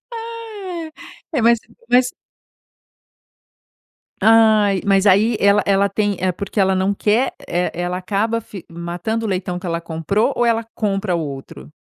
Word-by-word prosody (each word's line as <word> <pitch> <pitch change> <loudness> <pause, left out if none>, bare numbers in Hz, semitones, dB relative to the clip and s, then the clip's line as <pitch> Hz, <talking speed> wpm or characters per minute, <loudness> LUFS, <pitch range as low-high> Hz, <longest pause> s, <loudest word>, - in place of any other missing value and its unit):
ai. 440 -7 -7 0.4
É 270 - 0
mas 235 0 +5 0.3
mas 250 0 +4 2.1
Ai, 215 -2 +4
mas 195 0 +3
aí 210 +3 +4
ela 200 +1 +4
ela 200 0 +2
tem 205 0 -1
é 185 0 +1
porque 200 +3 -5
ela 190 0 +3
não 190 +1 +1
quer, 210 +5 +1
eh, 175 +1 -1
ela 175 +1 -3
ela 180 0 -2
acaba 215 +5 -1
fi 200 -4 -11
matando 175 +7 -4
o - - -2
leitão 180 -1 -2
que 185 - -10
ela 165 0 -1
comprou? 170 - -1
Ou 240 - +1
ela 230 -1 +2
compra 195 -3 -1
outro? 135 - -7
200 Hz, 150 wpm, -19 LUFS, 180-225 Hz, 2.1 s, mas